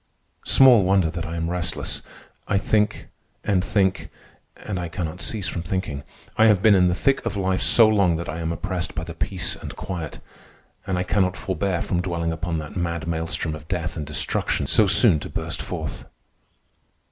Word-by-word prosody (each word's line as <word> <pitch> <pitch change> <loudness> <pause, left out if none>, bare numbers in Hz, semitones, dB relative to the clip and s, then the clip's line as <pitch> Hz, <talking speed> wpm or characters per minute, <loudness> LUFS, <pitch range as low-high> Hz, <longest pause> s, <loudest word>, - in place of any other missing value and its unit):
Small 125 -6 +7
wonder 95 -3 +2
that 85 +2 -5
I 80 - -5
am 80 0 -2
restless. 85 -2 -2 0.5
I 100 - +1
think, 105 +1 0 0.3
and 95 -3 +1
think, 95 -2 0 0.6
and 100 -4 -3
I 90 - -3
cannot 85 0 -5
cease 105 -4 -1
from 85 - -3
thinking. 85 -5 -3 0.3
I 110 - +6
have 105 -3 +3
been 110 -2 +7
in 90 -2 +5
the 90 - +1
thick 135 +5 +1
of 105 - -3
life 95 -1 0
so 115 -2 +6
long 100 -6 +3
that 85 +1 -4
I 80 - -4
am 80 0 -2
oppressed 90 0 -3
by - - -3
the - - -7
peace - - -1
and - - -9
quiet, 85 -5 -5 0.7
and 95 - -1
I 90 - 0
cannot 95 0 +1
forbear 95 -2 -1
from 90 -1 -1
dwelling 85 -2 -2
upon 80 +1 -3
that 75 -2 -7
mad 85 -2 -2
maelstrom 80 -1 -2
of 75 0 -9
death 85 -2 -3
and 80 - -4
destruction 75 +1 -1
so 110 - +4
soon 100 -4 +5
to - - -7
burst - - -4
forth. - - -5
90 Hz, 190 wpm, -23 LUFS, 85-100 Hz, 0.7 s, Small